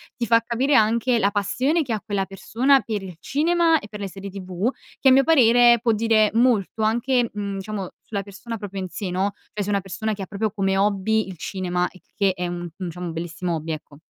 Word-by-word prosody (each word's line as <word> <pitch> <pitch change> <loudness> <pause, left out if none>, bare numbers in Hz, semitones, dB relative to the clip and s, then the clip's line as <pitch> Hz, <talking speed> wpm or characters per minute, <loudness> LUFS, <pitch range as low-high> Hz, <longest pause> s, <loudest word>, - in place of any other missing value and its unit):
ti 235 - -3
fa 230 +2 +5
capire 255 +5 +1
anche 235 +2 +3
la 200 -2 +2
passione 255 - +1
che 260 -6 -4
ha 215 - -2
quella 200 -3 -1
persona 250 +8 +2
per 215 -3 -3
il 185 -3 -8
cinema 330 - +2
e 205 - -11
per 210 - -8
le 200 - -3
serie 195 +1 -8
TV, 190 +2 -2 0.3
che - - +2
a - - +6
mio 270 +1 +6
parere 240 -5 +6
può 235 - +2
dire 220 -1 +3
molto 230 -3 +2
anche, 240 +3 +2
mhmm, 200 -1 -4
diciamo 195 -1 -5 0.2
sulla 200 -2 -2
persona 220 +4 -7
proprio 200 -2 -6
in 185 - -5
sé, 195 +1 -5
no, 190 +3 0 0.2
cioè 210 - -3
se - - -5
è - - -2
una 200 -1 +2
persona 205 +3 -3
che 200 - -7
ha - - -4
proprio 210 +2 -2
come 195 0 0
hobby 205 +2 +1
il 190 -2 -8
cinema, 180 +1 -2
il 185 - -18
che 195 -3 +2
è 180 -1 -4
un 175 0 -4
un 175 +2 -6
diciamo 180 +1 -6
un 165 - -5
bellissimo 170 +1 -3
hobby, 160 +1 -4
ecco. 150 -1 -8
205 Hz, 240 wpm, -23 LUFS, 190-235 Hz, 0.3 s, a